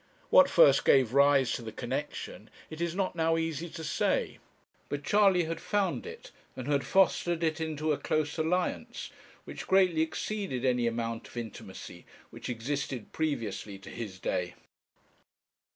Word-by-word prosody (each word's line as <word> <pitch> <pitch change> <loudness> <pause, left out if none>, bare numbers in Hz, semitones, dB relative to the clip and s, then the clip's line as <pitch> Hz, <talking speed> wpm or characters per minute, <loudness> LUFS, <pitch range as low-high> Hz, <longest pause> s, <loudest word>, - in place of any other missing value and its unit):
What - - +7
first - - +6
gave 130 -3 +4
rise 140 -2 +5
to - - -2
the 115 -1 -7
connexion - - -5 0.2
it 155 +1 -7
is 170 0 -1
not 190 -2 -1
now 165 0 +2
easy 165 0 -2
to 160 - -8
say; 155 0 0 0.5
but 145 0 -3
Charley 195 +1 +4
had 165 0 -4
found 205 - -1
it, 470 +2 -10 0.2
and 130 0 -6
had 140 -2 +1
fostered 175 -3 +2
it 160 0 0
into 155 -1 -1
a 145 - 0
close 155 -1 -1
alliance, 175 +3 -1 0.3
which - - -8
greatly 185 -4 +4
exceeded 160 - -2
any 125 -2 +2
amount 115 0 -3
of - - -13
intimacy 95 -6 -8 0.2
which - - -8
existed 125 +1 -3
previously 115 -10 -3
to 100 - -12
his 105 -6 -6
day. 90 -1 -2
155 Hz, 150 wpm, -30 LUFS, 120-170 Hz, 0.5 s, What